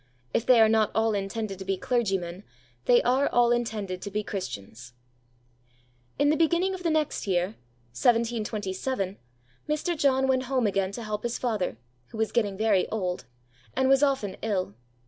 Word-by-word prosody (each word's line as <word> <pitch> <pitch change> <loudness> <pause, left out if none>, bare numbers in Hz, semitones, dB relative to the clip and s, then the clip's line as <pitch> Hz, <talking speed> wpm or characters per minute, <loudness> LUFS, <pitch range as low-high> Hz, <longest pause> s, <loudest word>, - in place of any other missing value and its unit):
"If 230 - 0
they 250 -2 +7
are 220 - +7
not 220 -1 +3
all 220 0 +2
intended 200 0 -3
to - - -5
be 195 0 -1
clergymen, 195 -6 -1 0.4
they - - +5
are 265 +3 +2
all 240 0 +3
intended 215 -6 -2
to 200 - -5
be 210 +1 -2
Christians." 120 - -6 1.2
In 290 +1 +3
the - - +3
beginning 340 +4 +2
of 375 - -6
the 340 - 0
next 310 -8 0
year 180 +1 +1 0.4
(1727), 215 - 0 0.5
Mr. 305 +3 0
John 270 -3 +2
went 260 -1 +1
home 255 -2 +1
again 195 -2 0
to 235 - -5
help 210 -1 -3
his 240 +1 -2
father, 215 - -1 0.3
who - - -10
was 220 0 0
getting 205 -5 0
very 210 -3 +2
old, 185 -5 -2 0.5
and 265 - +2
was 270 0 +5
often 270 -9 +1
ill. 195 - -1
220 Hz, 165 wpm, -27 LUFS, 195-260 Hz, 1.2 s, they